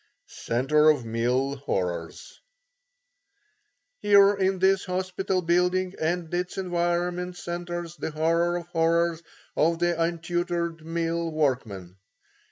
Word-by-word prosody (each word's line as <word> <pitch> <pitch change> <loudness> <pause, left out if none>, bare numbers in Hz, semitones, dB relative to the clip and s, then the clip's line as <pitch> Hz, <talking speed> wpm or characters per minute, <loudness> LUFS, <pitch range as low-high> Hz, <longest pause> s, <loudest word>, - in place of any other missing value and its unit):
CENTRE 150 +6 +2
OF 145 -6 +2
MILL 125 +5 0
HORRORS 90 -10 -4 1.6
Here 200 -1 +6
in 190 -1 0
this 190 +1 +3
hospital 185 0 -2
building 180 +2 +1
and 170 +1 -1
its 180 +1 -2
environment 175 0 -1
centres 175 -1 -5
the - - -3
horror 165 +3 +1
of 175 - -6
horrors 170 0 +1 0.3
of 165 +2 +2
the 175 -1 0
untutored 170 0 -2
mill 165 0 -2
workman. 120 - -2
170 Hz, 105 wpm, -26 LUFS, 155-180 Hz, 1.6 s, Here